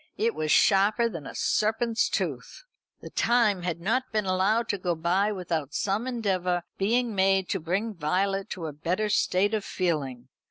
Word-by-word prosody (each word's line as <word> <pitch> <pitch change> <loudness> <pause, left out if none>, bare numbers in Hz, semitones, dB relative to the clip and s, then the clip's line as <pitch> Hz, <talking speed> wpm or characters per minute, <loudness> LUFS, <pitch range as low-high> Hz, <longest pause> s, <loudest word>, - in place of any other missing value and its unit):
It 230 +1 +1
was 155 -1 -2
sharper 210 +4 +4
than 165 -10 -7
a - - -9
serpent's 225 +1 +1
tooth. - - -3 0.4
The - - -10
time 225 -5 +2
had 175 -1 -3
not 230 +9 -1
been 215 -2 0
allowed 195 +5 +1
to 200 - -1
go 175 -1 -1
by 180 +6 +1
without 165 -7 -3
some 205 +5 -1
endeavour 185 -7 -1 0.2
being 230 +4 +1
made 190 -1 +2
to 195 - 0
bring 190 +7 -2
Violet 195 +4 -1
to 170 - -5
a 155 - -5
better 180 +8 -1
state 200 +1 +2
of 215 -2 0
feeling. 140 -11 -2
195 Hz, 170 wpm, -27 LUFS, 175-215 Hz, 0.4 s, sharper